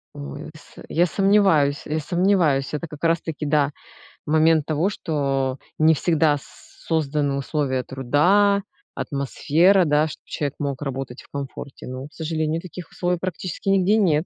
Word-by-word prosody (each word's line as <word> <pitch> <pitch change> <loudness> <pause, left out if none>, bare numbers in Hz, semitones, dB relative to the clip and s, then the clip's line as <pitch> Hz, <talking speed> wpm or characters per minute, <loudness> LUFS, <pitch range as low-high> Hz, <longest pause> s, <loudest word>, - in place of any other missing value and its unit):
Ой, 70 -1 -7
с - - -17
э, - - -10
я 170 +2 +3
сомневаюсь, 195 -7 +3
я 155 +1 -1
сомневаюсь, 170 -4 +1
это 150 +3 -3
как 150 0 -12
раз 165 0 +2
таки, 155 -2 -5
да, 145 -1 +2 0.5
момент 155 0 +3
того, 155 +5 +1
что 140 -8 -1 0.2
не 160 +1 +5
всегда 155 -2 +2
с - - -13 0.5
созданы 150 -3 0
условия 135 -2 -1
труда, 180 +12 +2 0.3
атмосфера, 165 +7 +2
да, 150 0 +3
чтоб 155 - -10
человек 145 -2 -3
мог 140 -1 -3
работать 135 -2 -5
в - - -19
комфорте. 140 0 -7
Но, 130 +2 -6
к 150 - -23
сожалению, 160 0 -2
таких 180 -1 -9
условий 180 0 -1
практически 185 +1 -4
нигде 195 +1 +4
нет. 165 -6 +2
155 Hz, 155 wpm, -23 LUFS, 140-175 Hz, 0.5 s, не